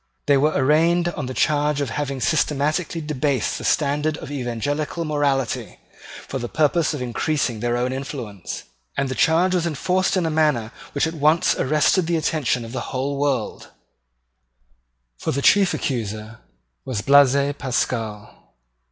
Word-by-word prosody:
They 145 - +4
were 150 +3 +3
arraigned 165 +5 +3
on 150 -6 -5
the 130 - -4
charge 150 -1 +1
of 140 -5 -2
having 140 +1 -3
systematically 155 +3 0
debased 145 -5 -1
the - - -8
standard 150 0 +1
of - - -8
evangelical 145 +5 -2
morality, 145 -4 -1 0.5
for 135 - -4
the 120 -1 -5
purpose 155 +1 +1
of 130 - -4
increasing 125 -1 -1
their 120 +1 0
own 125 +1 -1
influence; 125 - -6 0.3
and 135 -1 0
the - - -2
charge 170 +7 +3
was 175 -2 +1
enforced 180 +5 0
in 180 - +1
a 160 - 0
manner 150 -8 +1 0.2
which 140 - +1
at 160 - -3
once 155 +1 +3
arrested 150 +5 +2
the 170 -1 +1
attention 145 -6 0
of 115 - -9
the 130 - -5
whole 140 +2 -2
world: 140 -6 -1 1.5
for - - -2
the 140 - -1
chief 200 -2 +5
accuser 110 -3 -4 0.4
was 120 -6 -3
Blaise 140 +1 +5
Pascal. 115 -5 -3
145 Hz, 150 wpm, -22 LUFS, 130-155 Hz, 1.5 s, chief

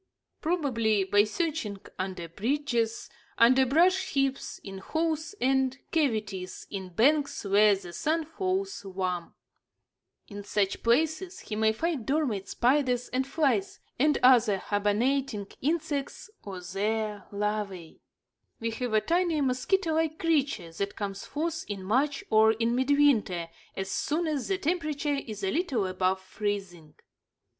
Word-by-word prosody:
Probably 235 - +1
by 205 +2 +4
searching 275 - -2 0.2
under 185 -2 -4
bridges, 235 - -1 0.3
under 255 +3 +5
brush 370 +7 +3
heaps, 275 -1 0
in 195 -1 -7
holes 320 - -2
and 265 0 +2
cavities 215 - -1
in 190 -2 -5
banks 280 - +2
where 205 +1 +5
the 180 -3 -9
sun 320 - 0
falls 380 - -2
warm. 185 -3 -3 0.9
In 205 -1 -8
such 200 -1 0
places 315 +9 +1
he 215 - -5
may 220 0 +3
find 295 +3 -2
dormant 270 -10 0
spiders 250 -1 +1
and 260 +1 -1
flies 270 -9 0 0.2
and 295 +2 +4
other 240 -5 +6
hibernating 210 +4 0 0.2
insects 300 +4 -2
or 190 -3 -7
their 210 +3 -2
larvæ. 205 -4 -3 0.6
We 230 0 -2
have 235 0 -3
a 215 - +4
tiny, 340 0 +1
mosquito 315 +7 +1
like 320 0 0
creature 280 - 0
that 200 +4 -3
comes 195 -2 -4
forth 325 +2 -2
in 200 -2 -5
March 270 +8 +1
or 220 0 +6
in 230 +1 0
midwinter, 255 -10 +2 0.3
as 190 0 -3
soon 310 - 0
as 300 -5 -2
the 390 - 0
temperature 305 -4 -1
is 210 -2 -7
a 190 - +1
little 295 - 0
above 185 0 0
freezing. 190 -5 -4
235 Hz, 135 wpm, -28 LUFS, 200-300 Hz, 0.9 s, other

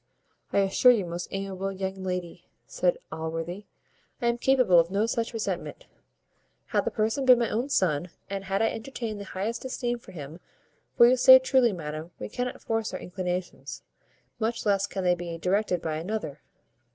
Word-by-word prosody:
"I 200 - +3
assure 195 +6 +5
you, 215 -6 +1
most 175 0 -5
amiable 195 0 -4
young 190 0 -4
lady," 180 -2 -4 0.2
said - - 0
Allworthy, 165 +5 -5 0.5
"I 235 - +1
am 235 0 -1
capable 250 -10 +5
of 165 0 +2
no 200 +3 +1
such 230 0 -1
resentment, 225 -2 -4 0.8
had - - +1
the - - +1
person 220 +5 0
been 255 -1 +7
my 235 -1 0
own 240 +6 -1
son, 175 - +1 0.2
and 195 0 -5
had 195 +2 0
I 225 - +3
entertained 225 -3 -5
the 200 - -7
highest 200 +5 -4
esteem 245 -2 -2
for - - -14
him. 155 0 -9 0.6
For 235 - +9
you 250 - +5
say 260 +1 +10
truly, 260 -2 +3
madam, 155 -2 -6
we - - -6
cannot 250 +3 -4
force 225 -1 -2
our - - -4
inclinations, 180 0 -5 0.6
much 230 +1 -2
less 200 -1 +2
can 190 -2 -4
they 180 0 +4
be 175 -1 -5
directed 180 0 0
by 155 -1 -2
another." 170 -4 -4
195 Hz, 175 wpm, -27 LUFS, 180-235 Hz, 0.8 s, say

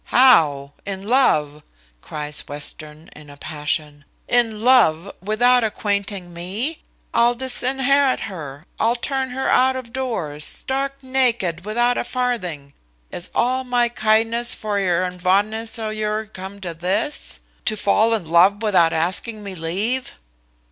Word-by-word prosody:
"How! 150 - +4
in 195 -1 -5
love!" 150 - +2 0.4
cries 150 0 -4
Western, 150 +2 -6
in 150 -1 -13
a 145 - -13
passion; 150 -1 -4 0.2
"in 225 -3 +1
love, 200 -8 +4
without 245 +5 +3
acquainting 200 -4 -2
me! 205 - -3 0.3
I'll 240 +1 +3
disinherit 265 +2 +1
her; 155 -7 -7
I'll 230 +2 +2
turn 265 +1 -2
her 260 +1 -3
out 260 +1 +3
of 245 -3 -7
doors, 200 - -3
stark 270 - -1
naked, 235 -10 0
without 240 +3 +1
a - - -1
farthing. 180 - -3 0.4
Is 175 - -2
all 255 +2 +1
my 245 -1 +1
kindness 225 +1 +2
vor 210 -2 -2
'ur, 180 -2 +1
and 180 0 -5
vondness 215 +5 +1
o'ur 215 -1 -2
come 195 -1 -9
to 175 -3 -4
this, 195 - -1 0.3
to 215 - 0
fall 220 +3 +3
in 205 -6 -4
love 185 +6 +4
without 180 -6 +3
asking 190 +7 0
me 200 -1 -6
leave?" 195 +10 -2
210 Hz, 135 wpm, -21 LUFS, 170-245 Hz, 0.4 s, How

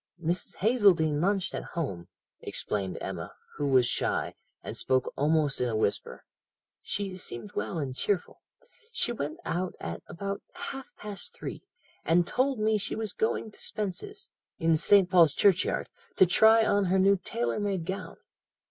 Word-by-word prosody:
"'Mrs. 175 +2 -2
Hazeldene 185 -10 +3
lunched 190 0 +1
at - - -3
home,' 95 - -3 0.3
explained 95 -4 -3
Emma, - - -6 0.2
who 145 - 0
was 130 -3 +5
shy, - - 0 0.3
and - - -6
spoke 130 -1 0
almost 150 -1 +2
in 125 - +1
a 110 - -2
whisper; 110 -2 -2 0.6
'she 200 -2 -3
seemed 120 - -3
well 110 +10 -3
and 135 -4 -3
cheerful. 195 +6 -2 0.5
She 445 - 0
went 155 -10 -4
out 180 +2 -2
at 85 0 -5
about 200 +3 -4
half 275 -7 -7
past 205 -2 -4
three, - - -6 0.4
and 170 +1 +3
told 260 +5 +1
me 215 0 +2
she - - -3
was 220 -3 -3
going 220 0 -1
to - - -14
Spence's, 215 - -4 0.3
in 165 0 +3
St. 195 +4 +5
Paul's 175 -5 +5
Churchyard, 190 -3 +2 0.3
to 190 - +7
try 220 +5 +6
on 205 -1 +2
her 185 +1 +2
new 195 +1 +5
tailor 120 0 -1
made 195 -5 -1
gown. 190 +2 -5
180 Hz, 155 wpm, -28 LUFS, 145-205 Hz, 0.6 s, to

